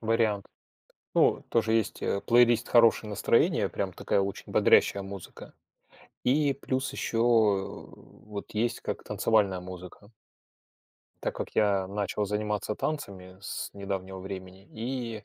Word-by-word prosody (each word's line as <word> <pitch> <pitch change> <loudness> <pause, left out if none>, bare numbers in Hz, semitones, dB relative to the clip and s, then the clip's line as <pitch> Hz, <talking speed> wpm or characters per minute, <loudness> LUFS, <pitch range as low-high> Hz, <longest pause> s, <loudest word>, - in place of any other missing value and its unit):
вариант. 110 -3 +1 0.7
Ну, - - +4
тоже 110 -1 +2
есть, 110 -2 0
э, 100 - -1
плейлист 120 -1 +4
"Хорошее 115 -2 +5
настроение", 105 - +2
прям - - -3
такая 100 - 0
очень 100 0 -5
бодрящая 100 - +4
музыка. 95 -2 -10 0.7
И 140 +2 +3
плюс 130 0 -2
ещё, 115 -4 +1
э, - - -16 0.3
вот 105 -1 -7
есть 115 +3 -1
как - - -4
танцевальная 100 -5 +1
музыка. 90 +3 -10 1.1
Так - - -2
как - - -4
я 100 -3 +3
начал 105 +1 -2
заниматься 105 +1 -2
танцами 95 -11 -5
с 100 - -5
недавнего 95 -1 -5
времени, 95 0 -8
и 115 -2 -4
105 Hz, 125 wpm, -28 LUFS, 95-115 Hz, 1.1 s, Хорошее